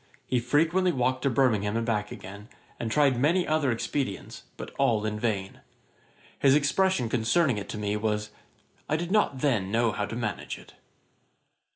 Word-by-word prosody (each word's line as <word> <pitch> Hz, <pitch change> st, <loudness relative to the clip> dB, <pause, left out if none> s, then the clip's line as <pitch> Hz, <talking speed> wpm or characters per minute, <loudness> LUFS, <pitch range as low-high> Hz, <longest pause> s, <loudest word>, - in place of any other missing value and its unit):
He 125 Hz, -, +1 dB
frequently 165 Hz, +9 st, +2 dB
walked 130 Hz, -2 st, 0 dB
to 140 Hz, -, +2 dB
Birmingham 115 Hz, -5 st, +2 dB
and 115 Hz, -, -1 dB
back 105 Hz, -3 st, -1 dB
again, 100 Hz, +4 st, -10 dB, 0.3 s
and 115 Hz, -, -2 dB
tried 140 Hz, -3 st, +3 dB
many 170 Hz, +7 st, +2 dB
other 155 Hz, -4 st, +2 dB
expedients, 115 Hz, -2 st, -3 dB, 0.2 s
but -, -, -7 dB
all 115 Hz, -6 st, +2 dB
in 105 Hz, 0 st, -2 dB
vain. 100 Hz, -4 st, -2 dB, 0.8 s
His 135 Hz, 0 st, +5 dB
expression 150 Hz, -1 st, +2 dB
concerning 120 Hz, +2 st, +2 dB
it 100 Hz, -, -8 dB
to -, -, -4 dB
me 105 Hz, 0 st, -1 dB
was 105 Hz, 0 st, -2 dB, 0.6 s
'I 155 Hz, -, +2 dB
did 170 Hz, +3 st, -3 dB
not 195 Hz, -11 st, +2 dB
then 115 Hz, -10 st, +1 dB
know 115 Hz, +1 st, +2 dB
how 105 Hz, -1 st, -2 dB
to -, -, -6 dB
manage 110 Hz, -5 st, -3 dB
it.' -, -, -16 dB
120 Hz, 170 wpm, -27 LUFS, 105-145 Hz, 0.8 s, His